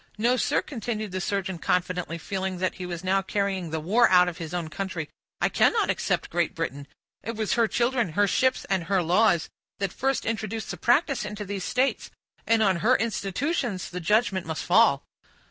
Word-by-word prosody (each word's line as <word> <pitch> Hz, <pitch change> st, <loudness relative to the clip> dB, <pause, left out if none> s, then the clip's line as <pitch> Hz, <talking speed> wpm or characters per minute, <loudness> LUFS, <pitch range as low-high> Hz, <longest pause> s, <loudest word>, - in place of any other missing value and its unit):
"No, 235 Hz, +4 st, +3 dB
sir," 255 Hz, -, +1 dB
continued 220 Hz, -5 st, -4 dB
the 185 Hz, 0 st, -3 dB
surgeon, 190 Hz, -2 st, -2 dB
confidently, 180 Hz, -1 st, -1 dB
feeling 190 Hz, +1 st, -3 dB
that 185 Hz, +1 st, -1 dB
he 180 Hz, -, -7 dB
was 175 Hz, 0 st, -5 dB
now 190 Hz, +1 st, +2 dB
carrying 195 Hz, -3 st, -2 dB
the 160 Hz, 0 st, -2 dB
war 210 Hz, +10 st, +3 dB
out 180 Hz, -1 st, +6 dB
of 180 Hz, 0 st, -5 dB
his 160 Hz, -2 st, -6 dB
own 175 Hz, -2 st, -3 dB
country, 170 Hz, -2 st, -5 dB, 0.3 s
"I -, -, +3 dB
cannot -, -, +3 dB
except -, -, -2 dB
Great -, -, 0 dB
Britain. 140 Hz, +2 st, -4 dB, 0.3 s
It 230 Hz, -, -5 dB
was 215 Hz, -1 st, -1 dB
her 230 Hz, -1 st, +3 dB
children, 235 Hz, -7 st, 0 dB
her 205 Hz, +4 st, +3 dB
ships, 260 Hz, +6 st, +1 dB
and 190 Hz, -3 st, -1 dB
her 190 Hz, 0 st, +1 dB
laws, 175 Hz, -1 st, +3 dB, 0.3 s
that 195 Hz, -2 st, -2 dB
first 270 Hz, 0 st, -1 dB
introduced 225 Hz, 0 st, -3 dB
the -, -, -6 dB
practice 275 Hz, +2 st, +2 dB
into 210 Hz, 0 st, -5 dB
these 200 Hz, -1 st, -4 dB
states; 260 Hz, +2 st, 0 dB, 0.4 s
and 225 Hz, -1 st, +4 dB
on 190 Hz, -4 st, +3 dB
her 235 Hz, +8 st, +3 dB
institutions 230 Hz, -, -2 dB
the 180 Hz, -, -4 dB
judgment 195 Hz, -1 st, +1 dB
must 160 Hz, -1 st, -3 dB
fall. 190 Hz, -7 st, +4 dB
195 Hz, 190 wpm, -26 LUFS, 180-225 Hz, 0.4 s, out